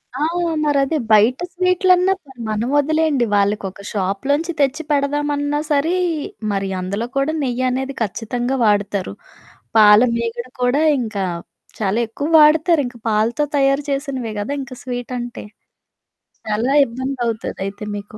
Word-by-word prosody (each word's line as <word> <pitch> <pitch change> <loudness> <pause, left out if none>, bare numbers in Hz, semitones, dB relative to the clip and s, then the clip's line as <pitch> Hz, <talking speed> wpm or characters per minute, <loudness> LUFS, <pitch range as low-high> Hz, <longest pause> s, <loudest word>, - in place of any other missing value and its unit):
ఆ! 285 - -1 0.4
మరదే, 290 +1 +1
బయట 215 +4 +5 0.2
స్వీట్‌లన్నా 365 +1 +3
సరే 265 -3 -17
మనం 215 +2 -1
ఒదిలేయండి, 310 -3 +1
వాళ్ళకొక 200 -1 0
షాప్‌లోంచి 270 - -1
తెచ్చి 285 +3 +1
పెడదామన్నా 290 0 0
సరే, 295 +4 +2 0.6
మరి 195 -1 -2
అందులో 200 +5 -3
కూడా 275 +3 +1
నెయ్యనేది 255 +1 -1
ఖచ్చితంగా 240 +5 -2
వాడతారు. 205 - 0 0.6
పాల 210 -1 +8 0.2
మీగడ 235 +1 -3
కూడా 250 +5 +2 0.2
ఇంకా 215 -4 -3 0.6
చాలా 210 +1 0
ఎక్కువ 285 +6 -4
వాడుతారు. 310 +2 +5
ఇంకా 245 -1 -11
పాలతో 220 +6 +1
తయారు 275 +1 +2
చేసినవే 275 -5 -3
గద, 205 - -4
ఇంక 265 -1 -8
స్వీటంటే. 245 -1 -5 1.0
చాలా 220 +5 0
ఇబ్బందవుతది 240 -3 -4
అయితే 200 +2 -8
మీకు. 205 +1 -8
250 Hz, 120 wpm, -19 LUFS, 215-285 Hz, 1.0 s, పాల